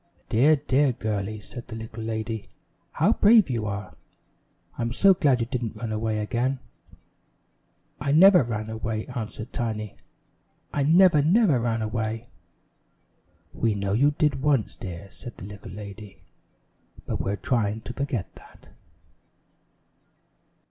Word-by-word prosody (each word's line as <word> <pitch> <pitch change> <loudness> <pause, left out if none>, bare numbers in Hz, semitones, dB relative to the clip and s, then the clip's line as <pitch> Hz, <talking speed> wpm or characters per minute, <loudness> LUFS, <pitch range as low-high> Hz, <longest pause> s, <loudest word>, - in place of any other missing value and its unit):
"Dear, 140 +8 +5
dear 140 -1 +2
girlie," 110 -1 -3
said 120 +4 -10
the 115 - -7
little 110 0 -7
lady. 110 -1 -4 0.4
"How - - +3
brave 210 - +5
you 115 -3 -2
are! 100 -4 -5 0.8
I'm 115 0 -2
so 195 +8 +6
glad 140 -8 +2
you - - +1
didn't 120 -3 -4
run 110 +1 -5
away 110 0 -1
again." 120 +5 -1 1.4
"I 140 - -1
never 180 +4 +8
ran 110 -3 -3
away," 110 0 -3
answered 115 -2 -6
Tiny. 110 -4 -3 0.8
"I 145 - 0
never, 165 +1 +5
never 170 - +4
ran 115 -1 -1
away!" 110 0 -3 1.2
"We 115 -3 0
know 100 -1 -1
you 135 +7 +4
did 150 -2 0
once, 140 -6 +1
dear," 90 0 -8
said 120 -4 -11
the - - -9
little 100 -2 -10
lady; 100 +1 -10 0.8
"but - - -2
we're 100 - -1
trying 110 -3 -1
to 125 - -7
forget 135 -7 -3
that." - - -18
115 Hz, 135 wpm, -25 LUFS, 110-135 Hz, 1.4 s, never